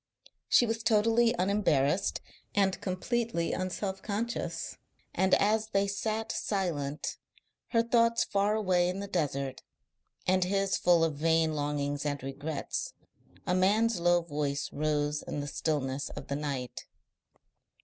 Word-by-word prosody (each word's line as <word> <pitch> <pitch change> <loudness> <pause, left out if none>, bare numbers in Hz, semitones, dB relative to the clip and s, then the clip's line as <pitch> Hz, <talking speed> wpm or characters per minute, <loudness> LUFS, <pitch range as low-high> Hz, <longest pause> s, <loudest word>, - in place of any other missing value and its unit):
She 240 - +6
was 225 0 -2
totally 230 +2 +3
unembarrassed 180 -5 +1 0.3
and 195 -2 +2
completely 200 -1 -1
un 185 0 -1
self 190 +1 -4
conscious. 225 +3 -3 0.4
And 190 0 +4
as 215 +1 +2
they 200 -2 +1
sat 215 +3 -2
silent, 155 -8 -2 0.5
her 230 -2 +2
thoughts 230 0 +3
far 200 +1 +1
away 185 -4 +2
in 185 +2 -3
the 200 - -4
desert, 140 -7 -2 0.6
and 185 0 +3
his 195 +1 +1
full 175 -2 +4
of 155 -3 0
vain 160 0 +2
longings 145 -1 -1
and 145 -2 -2
regrets, 140 +3 -4 0.5
a 180 - +1
man's 205 +3 +3
low 175 0 +3
voice 145 -3 -2
rose 150 0 0
in - - -5
the 145 - -3
stillness 140 -2 -2
of - - -9
the 140 - -1
night. 140 -4 -4
180 Hz, 135 wpm, -30 LUFS, 145-210 Hz, 0.6 s, She